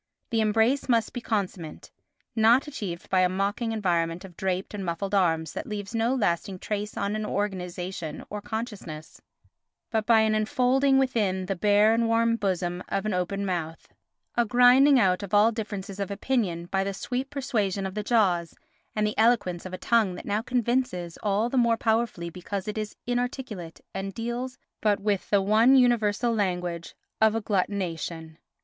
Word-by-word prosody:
The 225 -1 +2
embrace 225 +6 +2
must 230 -2 +2
be 245 - -4
consummate, 190 -8 -4 0.4
not 230 +4 +5
achieved 200 - -6
by 190 - +4
a 180 0 +4
mocking 200 +5 -1
environment 175 -4 0
of 180 -3 -13
draped 190 +1 -2
and 205 -2 -4
muffled 185 +3 -3
arms 165 -5 +1
that 305 - -5
leaves 205 -1 -5
no 230 +3 +1
lasting 190 -4 0
trace 210 +2 -4
on 215 +2 -1
organisation 180 -5 -4
or 210 0 -4
consciousness, 210 -9 -6 0.7
but 220 -2 0
by 225 -2 +6
an 220 0 +2
enfolding 255 +5 +2
within 210 -8 +1
the 195 +1 -2
bare 205 +3 +4
and 230 0 +2
warm 230 0 +3
bosom 180 -4 -1
of 195 +1 -1
an 215 - 0
open 190 +2 -1
mouth—a 175 +6 -4
grinding 250 +4 +6
out 185 -3 +3
of 200 0 -2
all 210 +3 +6
differences 205 -3 -5
of 200 - -2
opinion 200 -5 -1
by 195 +2 0
the 195 0 -3
sweet 250 +6 -3
persuasion 215 -9 -1
of 190 - -4
the 210 - -2
jaws, 195 -7 +1 0.4
and 215 0 +1
the 210 - -2
eloquence 210 -7 +2
of - - -10
a 185 - -5
tongue 220 -5 +2
that - - -9
now 205 +1 0
convinces 240 -8 -1
all 210 +2 +1
the 255 +1 +1
more 235 -1 +3
powerfully 220 -7 0
because 185 +3 -5
it 210 - -3
is 215 -1 -4
inarticulate 245 -8 -3
and 195 0 -5
deals 240 +2 -4 0.2
but 210 -2 +2
with 205 -1 -1
the 200 -1 +3
one 220 +6 +5
universal 240 -2 +3
language 180 -5 -2 0.3
of 220 0 +5
agglutination. 180 -6 -2
205 Hz, 170 wpm, -26 LUFS, 185-230 Hz, 0.7 s, by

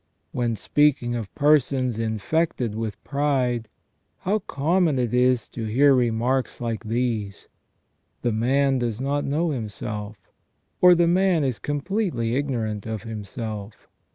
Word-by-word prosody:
When 120 -2 -1
speaking 130 +2 +2
of 115 -4 -4
persons 135 -5 +2
infected 115 +3 -1
with 110 -2 -5
pride, 130 -5 0 0.5
how 205 +4 +1
common 160 -1 +1
it 125 -3 -1
is 125 -2 +3
to 115 - -5
hear 135 +6 +4
remarks 125 +1 0
like 115 -1 -3
these: 110 -3 -2 0.8
The 120 - +1
man 135 +4 +2
does 120 -2 -2
not 140 +2 -1
know 155 +4 0
himself; 105 -3 -5 0.6
or. 180 -1 +8
The 170 0 +3
man 180 -2 +3
is 130 -4 -1
completely 145 - -1
ignorant 115 -7 -2
of 110 -2 -4
himself. 110 -1 -7
125 Hz, 125 wpm, -24 LUFS, 110-145 Hz, 0.8 s, or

